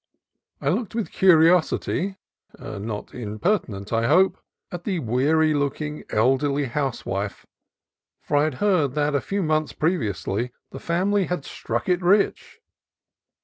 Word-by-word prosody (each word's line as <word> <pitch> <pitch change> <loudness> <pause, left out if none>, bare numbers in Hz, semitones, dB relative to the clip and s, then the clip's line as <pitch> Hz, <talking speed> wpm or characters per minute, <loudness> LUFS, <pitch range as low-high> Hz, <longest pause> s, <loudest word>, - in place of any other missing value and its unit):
I 140 - -1
looked 215 +6 -1
with 230 -3 -2
curiosity 180 +2 +3 0.4
(not 105 +1 -6
imper 125 - 0
tinent, 100 -1 -8
I 115 +1 +2
hope) 185 +7 +4 0.3
at 175 -1 -6
the 195 -4 -1
weary 155 +5 +2
looking, 150 +1 -2
elderly 140 +5 +2
house 135 0 -3
wife, 100 +1 -4 0.8
for 145 - -2
I 145 +1 +4
had 155 -4 -2
heard 160 -6 +1
that 150 0 +1
a 140 - +1
few 200 +6 -2
months 155 -1 0
previously 120 - -1 0.2
the 135 - -8
family 190 +5 +1
had 175 -5 -3
"struck 120 +1 -4
it 180 -1 +2
rich." 200 - +1
150 Hz, 140 wpm, -24 LUFS, 125-180 Hz, 0.8 s, hope